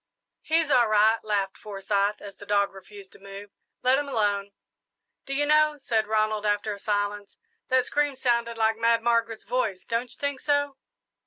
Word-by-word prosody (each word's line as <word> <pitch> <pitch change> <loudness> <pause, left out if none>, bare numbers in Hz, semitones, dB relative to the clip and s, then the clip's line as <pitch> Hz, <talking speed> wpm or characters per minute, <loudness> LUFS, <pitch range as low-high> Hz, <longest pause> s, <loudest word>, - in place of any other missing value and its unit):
"He's 320 -1 +1
all 245 -3 +5
right," 215 +1 +4
laughed 200 -3 -2
Forsyth, 200 0 -1
as 200 -1 -10
the 205 - -11
dog 200 -1 +1
refused 195 0 -13
to - - -16
move; 200 +1 -10 0.3
"let 255 +2 +4
him 290 -1 -4
alone." 205 -5 0 0.8
"Do 275 - -3
you 290 +1 +1
know," 305 0 +3
said 225 -6 -1
Ronald, 215 -1 0
after 205 0 0
a 200 - -9
silence, 205 0 -2 0.3
"that 255 -1 +2
scream 290 -1 0
sounded 235 -2 0
like 220 0 +1
Mad 230 0 +2
Margaret's 230 -1 0
voice. 225 -5 -2
Don't 230 +1 -2
you - - -10
think 285 -2 -2
so?" 285 -1 0
220 Hz, 175 wpm, -26 LUFS, 205-255 Hz, 0.8 s, all